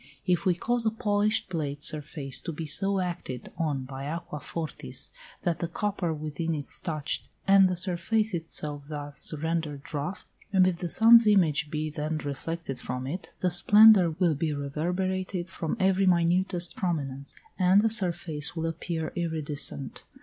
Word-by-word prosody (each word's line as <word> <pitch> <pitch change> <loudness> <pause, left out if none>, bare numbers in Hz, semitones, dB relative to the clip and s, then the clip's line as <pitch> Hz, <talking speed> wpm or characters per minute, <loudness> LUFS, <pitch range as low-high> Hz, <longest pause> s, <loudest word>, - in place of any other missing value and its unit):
If 180 +1 +1
we 180 - +3
cause 240 +6 0
a 220 - +3
polished 215 -1 0
plated 150 -5 -4
surface 145 -3 -2
to 170 - -5
be 160 +1 -5
so 195 +6 +1
acted 175 -9 -5
on 145 -5 -1
by 135 +1 -7
aqua 165 -1 -5
fortis 160 +1 -3 0.3
that 170 -3 0
the 170 - -2
copper 190 -1 -2
within 155 +1 -3
is 145 -2 -4
touched, 155 -3 -2 0.2
and 195 -1 +6
the 180 - -1
surface 185 +4 -1
itself 150 -3 -2
thus 145 -2 -4
rendered 155 -2 -3
rough, 150 +6 -4 0.3
and 190 -2 +5
if 180 -2 0
the 175 - -3
sun's 230 +4 +7
image 160 -7 +3
be 155 0 -3
then 155 +1 -3
reflected 145 0 -5
from 125 +1 -4
it, 165 +8 -5
the 180 - +1
splendour 205 +1 +7
will 175 -4 +3
be 155 +2 -1
reverberated 180 +5 -2
from 165 -3 -3
every 190 0 +3
minutest 175 0 +2
prominence, 140 -6 -3 0.2
and 185 +2 +5
the - - +4
surface 175 -8 0
will 165 -1 -2
appear 165 0 -3
iridescent. 155 -5 -2
170 Hz, 155 wpm, -27 LUFS, 150-185 Hz, 0.3 s, sun's